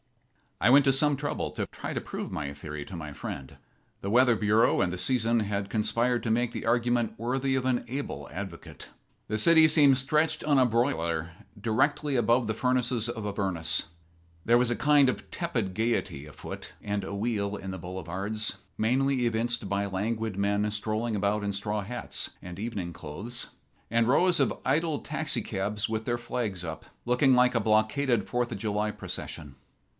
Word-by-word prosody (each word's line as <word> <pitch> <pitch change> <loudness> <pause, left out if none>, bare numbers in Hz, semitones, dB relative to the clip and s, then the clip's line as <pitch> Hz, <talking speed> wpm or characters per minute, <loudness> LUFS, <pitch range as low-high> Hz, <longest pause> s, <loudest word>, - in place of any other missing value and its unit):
I - - +4
went 140 +1 +7
to 135 - +5
some 145 +2 +3
trouble 145 +2 -3
to - - -3
try - - -6
to - - -2
prove - - -6
my 70 -2 -4
theory 75 0 -7
to 95 - -8
my 75 -3 -6
friend. 70 -2 -7 0.4
The 100 - -3
Weather 125 0 +5
Bureau 110 +1 +3
and 90 -1 +1
the - - -3
season 115 +3 +2
had 100 -1 -2
conspired 120 +2 +1
to 115 - 0
make 120 +1 +1
the - - -5
argument 120 0 +1
worthy 130 +3 0
of 130 -1 -1
an 125 -2 +1
able 135 +4 -5
advocate. 95 -3 -8 0.4
The 110 +1 -1
city 160 +5 +7
seemed 145 -4 +6
stretched 150 +4 +1
on 145 -2 +3
a 130 - +5
broiler 85 - 0 0.3
directly 135 +6 +1
above 120 +1 +3
the 110 - -1
furnaces 125 -2 +1
of 110 -3 -4
Avernus. 95 -6 0 0.6
There 120 +1 +5
was 125 0 +2
a 120 - +1
kind 145 -1 +5
of - - -4
tepid 115 - -2
gayety 110 -10 -1
afoot 75 - -9
and 105 -1 -2
awheel 100 0 -2
in 95 -1 -6
the 95 - -6
boulevards, 95 +5 -3 0.2
mainly 130 +3 +2
evinced 120 +1 -1
by 100 0 0
languid 110 +2 -2
men 100 +1 +1
strolling 110 +2 -1
about 105 +1 0
in 100 0 -1
straw 105 +2 -2
hats 120 +5 -3
and 90 +1 -8
evening 105 -6 -4
clothes, 105 +13 -5 0.4
and 115 0 +2
rows 175 +7 +4
of 140 - +1
idle 150 +2 +1
taxicabs 105 -9 -2
with 110 0 -2
their 120 0 0
flags 110 -6 -3
up, 80 -2 -6 0.2
looking 125 +2 +4
like 125 0 +4
a - - +4
blockaded 110 +2 +2
Fourth 120 -1 -1
of - - -3
July 105 -1 0
procession. 75 -8 -6
115 Hz, 175 wpm, -28 LUFS, 100-125 Hz, 0.6 s, went